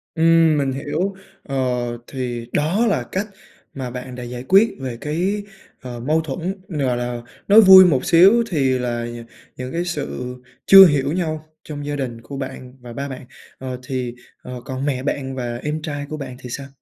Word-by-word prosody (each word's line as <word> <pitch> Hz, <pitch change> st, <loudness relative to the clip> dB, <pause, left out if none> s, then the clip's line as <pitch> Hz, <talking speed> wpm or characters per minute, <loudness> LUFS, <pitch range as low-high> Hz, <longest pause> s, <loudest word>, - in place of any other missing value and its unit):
Ừm, 165 Hz, -1 st, +4 dB
mình 135 Hz, -2 st, 0 dB
hiểu. 155 Hz, +8 st, -2 dB, 0.3 s
Ờ, 135 Hz, -, -6 dB, 0.5 s
thì 120 Hz, -3 st, -5 dB
đó 175 Hz, +11 st, +1 dB
là 205 Hz, -, +1 dB
cách 200 Hz, +3 st, -2 dB, 0.5 s
mà 130 Hz, -2 st, -5 dB
bạn 125 Hz, 0 st, -7 dB
đã 125 Hz, -, -7 dB
giải 120 Hz, +1 st, -7 dB
quyết 195 Hz, +10 st, +5 dB
về 125 Hz, -3 st, -5 dB
cái, 185 Hz, +7 st, -1 dB, 0.4 s
ờ, 125 Hz, -2 st, -7 dB
mâu 155 Hz, +6 st, +1 dB
thuẫn, 175 Hz, +6 st, -5 dB
gọi 135 Hz, -7 st, -1 dB
là, 120 Hz, -1 st, -4 dB, 0.3 s
nói 215 Hz, +2 st, +8 dB
vui 190 Hz, -2 st, +10 dB
một 135 Hz, -7 st, +2 dB
xíu 195 Hz, +8 st, +6 dB
thì 135 Hz, -6 st, +1 dB
là 120 Hz, -1 st, -2 dB
nh 120 Hz, 0 st, -8 dB, 0.3 s
những 125 Hz, 0 st, -6 dB
cái 170 Hz, +1 st, -2 dB
sự 140 Hz, -6 st, -4 dB, 0.3 s
chưa 195 Hz, 0 st, +10 dB
hiểu 145 Hz, -3 st, +2 dB
nhau 155 Hz, -3 st, -2 dB, 0.2 s
trong 145 Hz, -2 st, -7 dB
gia 145 Hz, 0 st, -3 dB
đình 120 Hz, -4 st, -4 dB
của 135 Hz, +4 st, -8 dB
bạn 130 Hz, -2 st, -7 dB
và 120 Hz, -1 st, -10 dB
ba 140 Hz, +2 st, -5 dB
bạn. 130 Hz, -1 st, -8 dB, 0.3 s
Ờ 130 Hz, -1 st, -6 dB
thì, 125 Hz, -2 st, -4 dB, 0.3 s
ờ, 125 Hz, -1 st, -8 dB
còn 130 Hz, 0 st, -4 dB
mẹ 130 Hz, -3 st, -1 dB
bạn 135 Hz, -2 st, -3 dB
và 120 Hz, -2 st, -4 dB
em 150 Hz, +1 st, -2 dB
trai 145 Hz, -2 st, -4 dB
của 155 Hz, -, -5 dB
bạn 130 Hz, -3 st, -7 dB
thì 125 Hz, -, -9 dB
sao? 135 Hz, +3 st, -6 dB
140 Hz, 195 wpm, -21 LUFS, 125-160 Hz, 0.5 s, vui